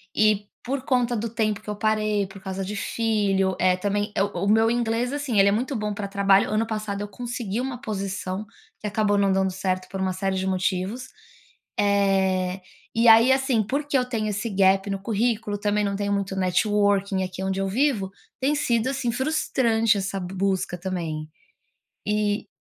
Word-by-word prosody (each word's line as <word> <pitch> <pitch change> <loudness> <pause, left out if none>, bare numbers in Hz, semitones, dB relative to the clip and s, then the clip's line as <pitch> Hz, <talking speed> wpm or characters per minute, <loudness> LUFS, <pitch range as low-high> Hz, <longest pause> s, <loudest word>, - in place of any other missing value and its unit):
e, 210 -1 +3 0.2
por 260 +1 -3
conta 245 -3 +1
do 230 +2 -2
tempo 215 -2 -1
que 215 - -10
eu 210 - -2
parei, 215 -1 +1
por 195 0 -12
causa 190 0 -4
de 195 +2 -5
filho, 200 -3 0
eh, 185 0 +4
também. 205 +2 -2 0.2
O 195 - -2
meu 220 +2 +4
inglês, 235 +1 0
assim, 285 -6 -2
ele 195 0 +6
é - - +2
muito 250 +7 -1
bom 210 -2 -2
pra 200 0 -4
trabalho, 195 0 +3
ano 215 +2 +1
passado 215 -2 -3
eu 205 - -3
consegui 235 -1 -4
uma 255 -1 -4
posição 195 -2 -4 0.3
que 210 - -4
acabou 205 0 +1
não 200 -1 +3
dando 190 0 +1
certo 185 0 -2
por 195 - -5
uma 190 -1 0
série 190 0 -1
de 190 0 -1
motivos. 190 +6 -1 0.7
Eh, 195 -2 +2 0.3
e 230 +1 +3
aí 225 +3 +7
assim, 265 -4 +2
porque 280 +6 -1
eu 250 - +1
tenho 220 -4 -2
esse 205 +3 -2
gap 195 0 +3
no 195 -1 -2
currículo, 220 0 -1
também 210 0 +1
não 200 - -1
tenho 200 0 -1
muito 200 -1 -1
networking 195 +1 +1
aqui 185 +1 -6
onde 190 0 -1
eu 195 - 0
vivo, 220 -2 +1 0.3
tem 280 +3 +1
sido, 235 -4 +1
assim, 265 -3 -1
frustrante 230 -5 +1
essa 195 0 -2
busca 185 0 -2
também. 165 -4 -4 0.8
E, 210 0 0
205 Hz, 180 wpm, -24 LUFS, 195-225 Hz, 0.8 s, aí